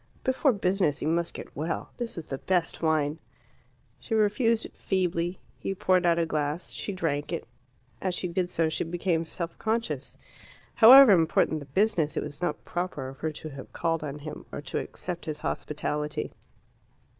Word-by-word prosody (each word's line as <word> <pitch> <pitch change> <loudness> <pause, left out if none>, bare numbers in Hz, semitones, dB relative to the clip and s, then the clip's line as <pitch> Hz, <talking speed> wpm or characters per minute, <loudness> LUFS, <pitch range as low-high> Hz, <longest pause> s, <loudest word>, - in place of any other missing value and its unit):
"Before 260 +2 +3
business 190 - +1
you - - 0
must 170 +1 0
get - - -9
well; 160 +4 -3
this 240 -5 -3
is 165 - -5
the 135 - -5
best 180 -3 0
wine." 155 -1 +1 0.8
She 225 - -2
refused 220 +2 +2
it - - -11
feebly. 175 -2 -1 0.2
He 195 - -3
poured 185 -1 +3
out 170 -1 +4
a 170 - +2
glass. 155 +1 -2
She - - -4
drank 160 -6 -2
it. 170 - -3 0.6
As 185 -2 0
she 180 - -1
did 175 +1 -1
so 165 -2 +1
she 155 - -1
became 170 0 0
self 170 0 -4
conscious. 225 +1 -2 0.6
However 255 +1 +10
important 160 -3 +3
the 145 - -10
business, 170 -1 +1
it - - 0
was 150 +2 -8
not 175 - -2
proper 175 -7 -3
of 135 - -12
her 155 - -1
to 155 +1 -8
have 135 -2 -10
called 165 -1 0
on 145 -1 -4
him, 150 +1 -8
or - - -5
to 135 - -2
accept 175 -1 -6
his 155 -2 -5
hospitality. 150 0 -2
170 Hz, 180 wpm, -28 LUFS, 150-190 Hz, 0.8 s, However